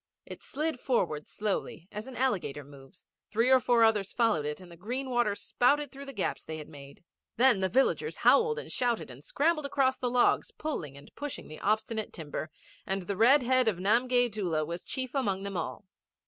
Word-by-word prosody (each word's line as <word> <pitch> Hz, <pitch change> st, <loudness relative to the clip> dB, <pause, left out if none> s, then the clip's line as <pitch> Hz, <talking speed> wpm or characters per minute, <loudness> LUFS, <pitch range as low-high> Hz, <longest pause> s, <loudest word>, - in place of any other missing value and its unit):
It -, -, -10 dB
slid 305 Hz, -1 st, -3 dB
forward 175 Hz, -, 0 dB
slowly 200 Hz, -4 st, -3 dB
as 210 Hz, +4 st, -6 dB
an 260 Hz, -, -9 dB
alligator 185 Hz, -, -1 dB
moves, 140 Hz, +3 st, -15 dB, 0.2 s
three 230 Hz, +4 st, +2 dB
or 260 Hz, -, +7 dB
four 240 Hz, -1 st, +3 dB
others 210 Hz, -3 st, +2 dB
followed 220 Hz, -11 st, +2 dB
it, 150 Hz, +3 st, -4 dB
and 180 Hz, -2 st, -13 dB
the -, -, -11 dB
green 250 Hz, +9 st, -4 dB
water 240 Hz, -4 st, +2 dB
spouted 285 Hz, +7 st, +1 dB
through 275 Hz, +1 st, -9 dB
the -, -, -6 dB
gaps 205 Hz, -8 st, -3 dB
they 160 Hz, -, -6 dB
had 150 Hz, -, -8 dB
made. 140 Hz, +1 st, -13 dB, 0.3 s
Then 245 Hz, -3 st, +5 dB
the 190 Hz, 0 st, +1 dB
villagers 270 Hz, -, +1 dB
howled 455 Hz, -1 st, +5 dB
and 480 Hz, -, -6 dB
shouted 240 Hz, -, -1 dB
and 125 Hz, +3 st, -13 dB
scrambled 305 Hz, -, +1 dB
across 270 Hz, -2 st, +1 dB
the 250 Hz, -, -1 dB
logs, 245 Hz, 0 st, +3 dB
pulling 160 Hz, -, -4 dB
and 140 Hz, -, -15 dB
pushing 290 Hz, -1 st, -6 dB
the 155 Hz, -, -9 dB
obstinate 220 Hz, +1 st, -1 dB
timber, 155 Hz, 0 st, -5 dB, 0.3 s
and 195 Hz, 0 st, -2 dB
the 200 Hz, +2 st, -3 dB
red 255 Hz, +7 st, +5 dB
head 255 Hz, 0 st, +3 dB
of 210 Hz, -5 st, +2 dB
Namgay 245 Hz, +6 st, +3 dB
Doola 175 Hz, -7 st, -1 dB
was 170 Hz, +3 st, -5 dB
chief 260 Hz, -2 st, -4 dB
among 200 Hz, -9 st, -1 dB
them 200 Hz, -1 st, -5 dB
all. 170 Hz, -, -4 dB
220 Hz, 200 wpm, -29 LUFS, 175-260 Hz, 0.3 s, or